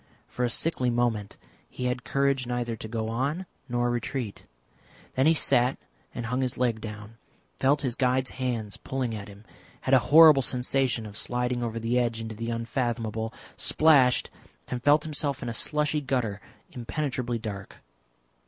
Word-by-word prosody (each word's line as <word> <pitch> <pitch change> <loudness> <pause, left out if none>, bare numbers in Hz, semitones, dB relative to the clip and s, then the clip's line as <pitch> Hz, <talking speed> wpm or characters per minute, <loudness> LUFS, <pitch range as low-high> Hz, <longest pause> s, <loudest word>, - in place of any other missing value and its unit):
For 125 - -3
a 120 - +2
sickly 130 -1 +1
moment 120 -4 -1 0.3
he 125 - -5
had 125 -1 -1
courage 140 -2 +1
neither 120 -1 -2
to 110 - -8
go 110 0 -3
on 140 +10 -1 0.2
nor 120 0 +1
retreat, 120 -2 -4 0.7
then 130 +3 +3
he 165 - +5
sat 125 -3 +3 0.4
and 120 - -4
hung 125 +3 -1
his 130 -2 -1
leg 120 -3 0
down, 105 0 -8 0.4
felt 145 +2 +2
his 130 -3 0
guide's 130 +1 +1
hands 120 -6 -3
pulling 130 -3 -3
at 105 -2 -6
him, 100 +1 -14 0.4
had 130 - 0
a 130 - +8
horrible 155 -2 +9
sensation 125 -2 0
of 105 -1 -9
sliding 125 +2 -1
over 115 -1 -2
the 115 +2 +1
edge 115 -2 0
into 115 0 -5
the 115 +2 -5
unfathomable, 115 -2 -2 0.3
splashed, 140 -6 +4 0.4
and 125 -1 -3
felt 145 +3 +4
himself 145 -4 -2
in 120 - -3
a - - -3
slushy 150 +4 +1
gutter, 125 -7 -1 0.3
impenetrably 125 -1 -3
dark. 105 -4 -7
125 Hz, 160 wpm, -27 LUFS, 115-135 Hz, 0.7 s, horrible